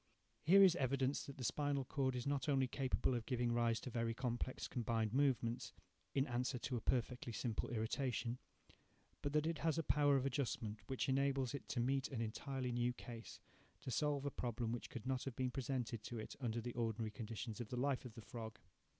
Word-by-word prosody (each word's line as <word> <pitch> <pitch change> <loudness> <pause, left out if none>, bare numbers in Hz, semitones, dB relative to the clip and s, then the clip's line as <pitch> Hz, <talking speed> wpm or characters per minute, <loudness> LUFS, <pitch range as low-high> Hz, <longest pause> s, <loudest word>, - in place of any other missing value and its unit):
Here 195 +5 +8
is 185 -3 +8
evidence 135 +1 +1
that 140 - -8
the 130 - -5
spinal 140 +1 +1
cord 130 -1 0
is 125 - -2
not 140 0 0
only 135 -2 +4
capable 130 0 +1
of 120 -2 -2
giving 120 -2 +1
rise 115 -1 +3
to 125 - -5
very 115 -1 0
complex 125 +1 -2
combined 115 -2 0
movements, 130 -3 +2 0.4
in 135 -1 +4
answer 125 +1 0
to 125 +1 -2
a 115 - -1
perfectly 125 +1 0
simple 115 -1 -1
irritation; 120 +1 -1 0.8
but 145 - -1
that 150 0 +3
it 165 -1 0
has 160 -1 +2
a 165 - +1
power 145 -1 +4
of 135 -1 +2
adjustment 120 -5 -1
which 130 - -1
enables 135 -1 +2
it 140 - -5
to 125 - 0
meet 135 +3 +2
an 130 - -4
entirely 125 +3 -2
new 120 +1 +1
case—to 120 +2 -10
solve 145 +2 +1
a 140 - 0
problem 120 -2 -2
which 120 - -3
could 120 -4 -6
not 130 -1 0
have 135 -3 -4
been 130 0 0
presented 125 -3 -2
to 120 - -4
it 110 - -5
under 120 -3 -1
the 120 +1 -4
ordinary 115 -2 -1
conditions 115 0 -5
of 115 - -6
the 125 - -3
life 135 +1 +1
of 125 -4 -9
the 115 - -7
frog. 110 0 -7
125 Hz, 200 wpm, -40 LUFS, 115-135 Hz, 0.8 s, Here